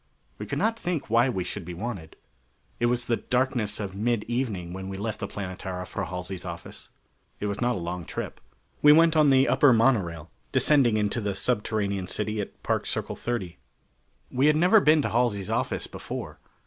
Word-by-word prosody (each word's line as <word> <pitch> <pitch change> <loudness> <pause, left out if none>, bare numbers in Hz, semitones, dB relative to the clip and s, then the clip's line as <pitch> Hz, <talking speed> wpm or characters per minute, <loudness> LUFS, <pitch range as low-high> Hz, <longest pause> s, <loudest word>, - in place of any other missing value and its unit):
We - - -5
could - - -3
not 225 +1 +1
think 170 -10 -3
why 120 +3 +4
we 95 -7 -1
should 95 +2 -5
be 85 +1 -7
wanted. 95 -5 -6 0.6
It 120 - +2
was 120 0 +1
the 115 - +1
darkness 125 -5 0
of 100 -2 -5
mid 115 +1 0
evening 110 -8 -3
when 95 0 -6
we 95 - -5
left 105 +1 -3
the - - -3
Planetara 95 -1 -5
for - - -4
Halsey's 90 0 -5
office. - - -8 0.5
It - - -3
was 100 +1 -3
not 120 0 +2
a - - -3
long 85 0 -4
trip. - - -6 0.4
We 150 0 +8
went 165 +1 +5
on 155 -2 +5
the 135 0 +5
upper 145 - +5
monorail, 100 - +1 0.2
descending 130 -7 +4
into 105 +2 0
the 100 -2 -2
subterranean 100 -4 -1
city 105 +2 -2
at 100 - -9
Park - - 0
Circle - - -2
30. 95 - -4 0.7
We 130 +3 +3
had 150 - +5
never 180 +7 +6
been 155 -4 +4
to - - 0
Halsey's 115 -5 0
office - - -1
before. - - -7
110 Hz, 190 wpm, -26 LUFS, 95-125 Hz, 0.7 s, We